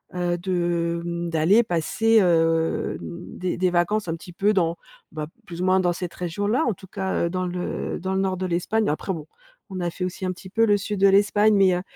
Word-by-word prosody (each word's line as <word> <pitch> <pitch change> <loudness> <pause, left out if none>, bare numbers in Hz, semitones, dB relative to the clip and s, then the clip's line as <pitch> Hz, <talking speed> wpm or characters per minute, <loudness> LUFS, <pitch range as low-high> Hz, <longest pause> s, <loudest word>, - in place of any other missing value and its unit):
heu, 175 -1 0
de, 170 -2 -1
mmh, 170 0 -3
d'aller 165 +8 +4
passer, 220 +5 +2
heu, 165 -2 +2
mmh, 170 +1 -8
des 180 -1 -2
des 185 0 +2
vacances, 175 +3 +1
un 165 - -1
petit 175 +2 -11
peu 205 +4 +2
dans, 170 -3 +1 0.3
bah, 155 -1 -5 0.2
plus 175 0 -7
ou - - 0
moins, 185 0 +4
dans 175 -1 +2
cette 175 -1 -5
région-là 205 - -1
en 235 - +1
tout 190 +1 -14
cas, 190 -2 -1
heu, - - -1
dans 185 0 -2
le 180 0 -3
dans 190 +2 -3
le 190 - +1
nord 190 -1 0
de 185 - -2
l'Espagne, 185 +5 0
après 155 +6 -1
bon, 155 -3 -6 0.4
on 185 -2 -5
a 175 - 0
fait 180 +2 -4
aussi, 185 +1 -5
un 185 - 0
petit 185 +1 -10
peu 225 +3 +3
le 205 -1 +4
sud 205 0 -4
de 195 - +7
l'Espagne, 205 +2 +4
mais, 190 -2 +4
heu, 180 - -2
180 Hz, 235 wpm, -24 LUFS, 170-195 Hz, 0.4 s, de